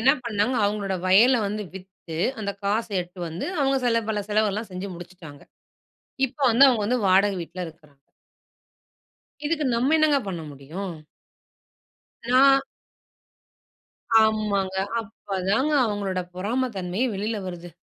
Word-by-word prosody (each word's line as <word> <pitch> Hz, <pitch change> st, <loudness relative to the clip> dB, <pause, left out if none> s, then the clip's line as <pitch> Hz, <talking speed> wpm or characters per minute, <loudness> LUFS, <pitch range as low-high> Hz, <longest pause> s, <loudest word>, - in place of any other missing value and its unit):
என்ன 260 Hz, +4 st, +5 dB
பண்ணாங்க, 220 Hz, +2 st, 0 dB
அவுங்களோட 200 Hz, -1 st, -1 dB
வயல 230 Hz, +7 st, +6 dB
வந்து 210 Hz, +1 st, -3 dB
வித்து, 185 Hz, -3 st, -10 dB, 0.2 s
அந்த 200 Hz, -2 st, -2 dB
காச 210 Hz, +3 st, +1 dB
எடுத்துட்டு 175 Hz, 0 st, -5 dB
வந்து, 165 Hz, +3 st, -5 dB
அவுங்க 270 Hz, 0 st, +2 dB
சில 230 Hz, -1 st, +2 dB
பல 210 Hz, -1 st, -1 dB
செலவெல்லாம் 210 Hz, 0 st, 0 dB
செஞ்சு 185 Hz, +2 st, -5 dB
முடிச்சுட்டாங்க. 175 Hz, -4 st, -12 dB, 0.9 s
இப்ப 265 Hz, +3 st, -21 dB
வந்து 250 Hz, +5 st, +7 dB
அவுங்க 235 Hz, -5 st, +2 dB
வந்து 250 Hz, +1 st, +1 dB
வாடகை 195 Hz, +1 st, +4 dB
வீட்ல 180 Hz, +2 st, -6 dB
இருக்குறாங்க. 150 Hz, -3 st, -17 dB, 1.5 s
இதுக்கு, 305 Hz, 0 st, 0 dB
நம்ம 260 Hz, +6 st, +2 dB
என்னங்க 305 Hz, -2 st, +4 dB
பண்ண 175 Hz, -4 st, -4 dB
முடியும்? 165 Hz, +7 st, -7 dB, 1.4 s
நான், 270 Hz, +2 st, +6 dB, 1.6 s
ஆமாங்க. 210 Hz, -3 st, +1 dB, 0.3 s
அப்பதாங்க 205 Hz, +4 st, -2 dB
அவுங்களோட 200 Hz, -3 st, -2 dB
பொறாமை 230 Hz, +8 st, -1 dB
தன்மையே 190 Hz, +7 st, -1 dB
வெளில 215 Hz, +3 st, -2 dB
வருது. 175 Hz, -1 st, -8 dB
205 Hz, 120 wpm, -24 LUFS, 185-235 Hz, 1.6 s, வந்து